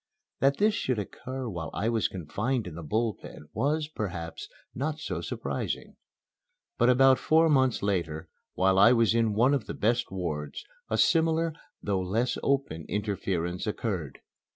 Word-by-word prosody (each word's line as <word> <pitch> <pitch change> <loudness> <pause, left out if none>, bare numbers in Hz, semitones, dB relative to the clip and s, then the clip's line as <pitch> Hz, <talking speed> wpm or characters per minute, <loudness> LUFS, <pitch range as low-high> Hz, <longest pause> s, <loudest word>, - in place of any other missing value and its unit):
That 140 +1 +3
this 210 +1 +3
should 130 - -1
occur 130 +5 -5
while 85 -6 -4
I 105 - -1
was 115 -2 +2
confined 105 - -2
in 90 - -7
the 85 - -7
Bull 110 +8 0
Pen 75 - -11
was, 150 +2 0
perhaps, 90 - -5 0.2
not 150 +4 -2
so 160 - -4
surprising. - - -4 0.8
But 120 +1 +5
about 130 +1 +6
four 160 +1 +4
months 130 -6 +3
later, 85 -5 -1 0.3
while 95 +1 +3
I 115 +5 +8
was 115 -2 +3
in 115 -2 +2
one 125 +6 +4
of 135 -6 -1
the - - -5
best 120 +3 +1
wards, 80 -6 -4 0.2
a - - 0
similar, 165 0 +3 0.3
though 100 -2 0
less 110 +7 0
open, 135 - -1
interference 95 -3 -2
occurred. 95 - -3
110 Hz, 155 wpm, -28 LUFS, 90-135 Hz, 0.8 s, I